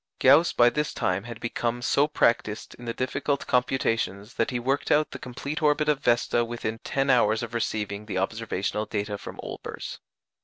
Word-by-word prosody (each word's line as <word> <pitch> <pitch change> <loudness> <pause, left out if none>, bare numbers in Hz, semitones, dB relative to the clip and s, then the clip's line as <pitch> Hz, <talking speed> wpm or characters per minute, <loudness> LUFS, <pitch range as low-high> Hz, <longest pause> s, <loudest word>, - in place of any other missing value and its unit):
Gauss 145 +6 +6
by 120 0 +5
this 150 +2 -2
time 90 +3 0
had 115 -1 -8
become 120 +1 -2
so 140 +3 +3
practised 115 -7 +1
in 120 - -9
the 115 - -2
difficult 140 +2 -1
computations 115 -4 0
that 115 - 0
he 125 - -1
worked 135 +4 -1
out 150 +1 +3
the - - -7
complete 140 +6 -5
orbit 150 0 +3
of 150 -2 +2
Vesta 120 -2 +2
within 115 -1 -4
ten 135 +2 0
hours 110 -2 +3
of 115 -1 -6
receiving 105 -2 -2
the 100 - -3
observational 105 +1 -2
data 105 -1 -3
from - - -9
Olbers. - - -7
120 Hz, 180 wpm, -26 LUFS, 110-135 Hz, -, Gauss